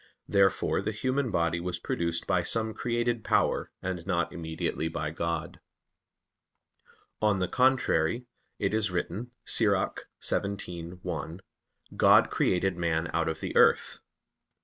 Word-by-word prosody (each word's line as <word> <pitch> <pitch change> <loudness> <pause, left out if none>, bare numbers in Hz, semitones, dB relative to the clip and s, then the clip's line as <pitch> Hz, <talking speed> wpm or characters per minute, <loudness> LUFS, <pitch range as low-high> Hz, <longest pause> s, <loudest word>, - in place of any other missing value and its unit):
Therefore 100 -1 +2
the - - -2
human 130 +4 -1
body 85 -3 +1
was 90 0 -3
produced 85 0 -2
by 95 -3 +2
some 110 +5 -1
created 120 -1 -1
power, - - +1
and 90 -2 -3
not 85 0 0
immediately 80 -1 -3
by 75 -2 -3
God. 85 0 -3 1.6
On 105 -2 +3
the 90 -1 0
contrary, 125 -5 +2 0.3
It - - -1
is 110 -1 +1
written 95 +6 -3 0.2
(Ecclus. - - +1
17:1): 90 -3 -3 0.5
"God - - +6
created 95 0 +1
man 85 -1 0
out 85 -1 +1
of 80 - -4
the - - -4
earth." - - +4
90 Hz, 125 wpm, -29 LUFS, 85-110 Hz, 1.6 s, God